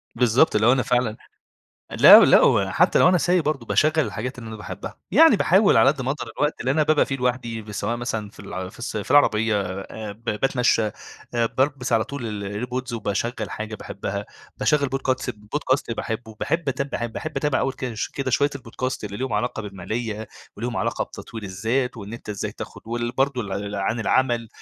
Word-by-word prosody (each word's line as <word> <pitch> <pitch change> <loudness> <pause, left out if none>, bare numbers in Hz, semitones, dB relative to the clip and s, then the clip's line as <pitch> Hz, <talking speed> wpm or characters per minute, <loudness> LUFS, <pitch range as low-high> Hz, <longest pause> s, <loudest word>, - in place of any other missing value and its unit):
بالضبط 125 +3 +3
اللي 110 +2 +3
هو - - +7
أنا 130 -1 +2
فعلًا 125 -3 0 0.7
لا، - - +9
لا، - - +6
وحتى - - +3
لو 180 - +6
أنا 180 -1 +4
سايق 180 -1 +2
برضو 140 -6 -2
باشغَّل 155 0 +3
الحاجات 125 0 -5
اللي 115 -2 -8
أنا 110 - -7
باحبها، 105 - -8
يعني 320 -7 +7
باحاول 195 +3 +4
على 135 - +6
قدّ 140 -3 -4
ما 130 - -1
اقدر 150 - -5
الوقت 150 +1 0
اللي 130 - -1
أنا 155 +2 +3
بابقى 155 0 +3
فيه 135 - -2
لوحدي، 120 -4 -3
سواء 105 +3 -2
مثلًا 115 -4 -4
في - - -15
الع 95 0 -6
في - - -15
الس 120 -2 -5
في 105 - -5
العربية 110 -7 +4
آآ، 100 +3 -6
ب 115 +3 -21
باتمشى 125 +1 +1 0.5
آآ 115 -1 +2
بالبس 130 -3 0
على 110 -1 +3
طول 110 -7 -5
ال 105 +4 -4
air - - -25
pods 125 -1 -3
وباشغل 110 -1 -2
حاجة 110 0 -5
باحبها، 100 0 -5 0.3
باشغل 145 -3 +2
podcats 130 -1 -1
podcast 115 +3 -2
باحبه، 110 -1 -5
باحب 165 -3 -1
أتاب 135 +1 -1
ب 120 -4 -4
باحب 155 0 -6
أتابع 150 -3 +1
أول 135 - 0
كده 125 -3 -5 0.2
كده 135 -1 -2
شوية 145 +3 +2
ال 140 - -6
podcast 130 +2 -4
اللي 100 0 -5
ليهم 130 -1 -3
علاقة 110 +1 -1
بالمالية، 105 +3 -5 0.3
وليهم 120 +2 -4
علاقة - - -1
بتطوير 115 -2 -9
الذات 115 +7 -1
وإن 105 0 -8
أنت 115 - -10
إزاي 100 -2 -4
تاخد - - -9
وال 120 +1 -2
برضو 135 -1 0
ل 100 +1 -4
عن 100 +4 -1
العمل 120 -2 +1
120 Hz, 200 wpm, -23 LUFS, 110-135 Hz, 0.7 s, لا